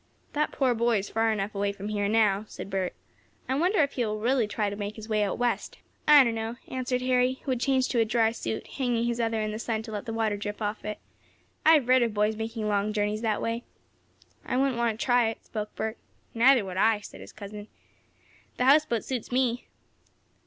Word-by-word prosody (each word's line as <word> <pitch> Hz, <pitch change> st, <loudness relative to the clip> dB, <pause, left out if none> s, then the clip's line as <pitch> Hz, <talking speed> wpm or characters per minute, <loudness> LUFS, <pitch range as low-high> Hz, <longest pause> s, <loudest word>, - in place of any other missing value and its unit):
"That 300 Hz, +1 st, 0 dB
poor 260 Hz, -3 st, +2 dB
boy 235 Hz, 0 st, +2 dB
is 200 Hz, 0 st, -4 dB
far 225 Hz, 0 st, +2 dB
enough 205 Hz, -1 st, -2 dB
away 200 Hz, 0 st, 0 dB
from 200 Hz, +1 st, -7 dB
here 205 Hz, -1 st, 0 dB
now," 210 Hz, -2 st, +2 dB
said 195 Hz, -, -8 dB
Bert. 190 Hz, -2 st, -2 dB, 0.5 s
"I 260 Hz, -, 0 dB
wonder 345 Hz, +5 st, +3 dB
if 280 Hz, -, -1 dB
he 245 Hz, -, -1 dB
will 215 Hz, -1 st, -2 dB
really 240 Hz, 0 st, +2 dB
try 210 Hz, 0 st, -1 dB
to 200 Hz, -, -3 dB
make 205 Hz, 0 st, -5 dB
his 220 Hz, -1 st, -9 dB
way 215 Hz, -1 st, +1 dB
out 200 Hz, -2 st, 0 dB
west?" 245 Hz, 0 st, -1 dB, 0.3 s
"I 295 Hz, -2 st, +9 dB
don't 235 Hz, -2 st, 0 dB
know," 225 Hz, +1 st, -3 dB
answered 255 Hz, -1 st, -2 dB
Harry, 255 Hz, 0 st, +3 dB
who 270 Hz, -, -2 dB
had 250 Hz, -, 0 dB
changed 260 Hz, 0 st, +1 dB
to 240 Hz, -, +1 dB
a 225 Hz, -, +4 dB
dry 225 Hz, 0 st, +2 dB
suit, 225 Hz, -1 st, -4 dB
hanging 245 Hz, -4 st, -1 dB
his 235 Hz, 0 st, -1 dB
other 225 Hz, -1 st, 0 dB
in 215 Hz, -, -2 dB
the 215 Hz, -, -5 dB
sun 225 Hz, -1 st, -2 dB
to 220 Hz, -, -8 dB
let 210 Hz, +2 st, -5 dB
the -, -, -2 dB
water 220 Hz, -2 st, 0 dB
drip 205 Hz, +1 st, -5 dB
out 210 Hz, 0 st, -2 dB
of -, -, -16 dB
it. 210 Hz, 0 st, -3 dB, 0.7 s
"I've 310 Hz, -5 st, +5 dB
read 255 Hz, 0 st, +5 dB
of 230 Hz, -3 st, 0 dB
boys 210 Hz, +1 st, +2 dB
making 220 Hz, 0 st, -4 dB
long 205 Hz, 0 st, 0 dB
journeys 210 Hz, 0 st, -1 dB
that 220 Hz, -3 st, 0 dB
way." 230 Hz, +1 st, -2 dB, 0.8 s
"I -, -, -2 dB
wouldn't 265 Hz, -2 st, +1 dB
want 230 Hz, -2 st, 0 dB
to -, -, -2 dB
try 245 Hz, -2 st, +4 dB
it," 225 Hz, -, -8 dB
spoke 210 Hz, -2 st, -5 dB
Bert. 220 Hz, +1 st, -3 dB, 0.3 s
"Neither 240 Hz, -1 st, +5 dB
would 185 Hz, -1 st, -6 dB
I," 220 Hz, +1 st, +3 dB
said -, -, -11 dB
his -, -, -11 dB
cousin. 205 Hz, 0 st, -9 dB, 0.9 s
"This 250 Hz, -, +1 dB
houseboat 270 Hz, -5 st, +4 dB
suits 250 Hz, -3 st, -4 dB
me!" 245 Hz, -1 st, 0 dB
225 Hz, 230 wpm, -27 LUFS, 210-250 Hz, 0.9 s, I